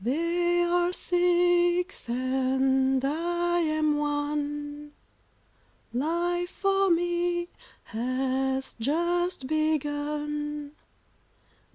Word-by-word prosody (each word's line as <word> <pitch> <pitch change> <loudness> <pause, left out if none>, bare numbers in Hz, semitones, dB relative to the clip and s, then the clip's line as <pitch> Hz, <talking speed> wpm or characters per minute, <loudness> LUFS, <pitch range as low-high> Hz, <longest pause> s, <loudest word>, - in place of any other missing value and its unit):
They 345 +6 +1
are 350 0 +2
six, 355 -2 +2
and 265 +1 +1
I 345 +4 0
am 310 -2 +1
one, 295 0 -3 1.0
Life 345 +6 0
for 390 0 +1
me 345 0 +1 0.3
has 265 +3 -1
just 345 +4 0
begun. 295 0 -2
310 Hz, 65 wpm, -27 LUFS, 275-345 Hz, 1.0 s, are